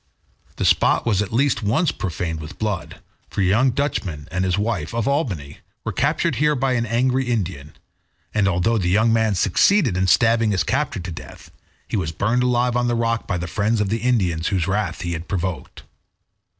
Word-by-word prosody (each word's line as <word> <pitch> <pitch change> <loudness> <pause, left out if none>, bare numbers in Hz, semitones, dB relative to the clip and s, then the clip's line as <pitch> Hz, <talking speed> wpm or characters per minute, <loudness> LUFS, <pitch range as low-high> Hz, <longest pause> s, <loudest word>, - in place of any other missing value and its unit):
The - - -2
spot - - +3
was 105 -4 +2
at 105 - -3
least 135 +4 +1
once 125 - +1
profaned 85 -3 -4
with 75 0 -9
blood, 105 -4 -4 0.3
for - - -2
a - - +3
young 105 +8 +3
Dutchman 95 - -2
and 90 +1 -1
his 95 0 0
wife, 105 -4 -2
of 115 -2 -1
Albany, 95 - -2 0.2
were - - -3
captured - - 0
here 150 0 +2
by 135 0 0
an 115 -2 0
angry 130 +3 +1
Indian, 90 - -3 0.6
and 105 -2 +2
although 95 +5 +1
the 90 -2 0
young 110 +5 +3
man 110 -2 +2
succeeded 120 - +3
in 95 +1 +1
stabbing 115 +2 +3
his 95 -3 +1
captor 145 -7 -1
to 90 0 -6
death, 80 - -11 0.4
he - - -2
was 85 -5 -2
burned 110 +10 0
alive 125 -1 +1
on 120 0 +1
the 120 - +1
rock 115 0 -1
by 90 - -1
the 85 - -4
friends 105 +6 0
of 105 -2 0
the 115 +2 0
Indian 100 -10 +1
whose 90 -1 0
wrath 95 -3 -1
he 85 0 -3
had 80 +1 -6
provoked. 90 -6 -4
105 Hz, 200 wpm, -21 LUFS, 90-120 Hz, 0.6 s, spot